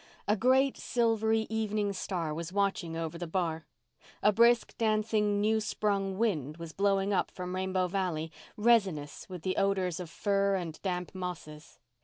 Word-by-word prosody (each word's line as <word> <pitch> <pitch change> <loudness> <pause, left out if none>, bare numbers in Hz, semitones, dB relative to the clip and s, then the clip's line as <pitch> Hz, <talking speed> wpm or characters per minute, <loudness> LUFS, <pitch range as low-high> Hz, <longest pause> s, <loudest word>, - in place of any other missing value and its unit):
A 210 - +3
great 260 +5 +3
silvery 225 -2 +1
evening 215 -2 0
star 175 -5 -3
was 165 +2 -5
watching 195 -4 0
over 165 0 -4
the 175 - -4
bar. 165 -3 -2 0.6
A 210 - +6
brisk, 235 +3 +4
dancing, 215 -2 +1
new 220 +2 +2
sprung 200 -3 -1
wind 160 - 0
was 165 -2 -8
blowing 200 0 +1
up - - +1
from 180 0 -6
Rainbow 185 0 0
Valley, 175 -4 -2 0.3
resinous 200 -12 +1
with 180 -3 -7
the 185 - -1
odours 190 -3 +1
of 175 -3 -6
fir 200 +2 +1
and 170 -4 -5
damp 180 -2 -3
mosses. 170 -4 -7
195 Hz, 155 wpm, -30 LUFS, 170-210 Hz, 0.6 s, A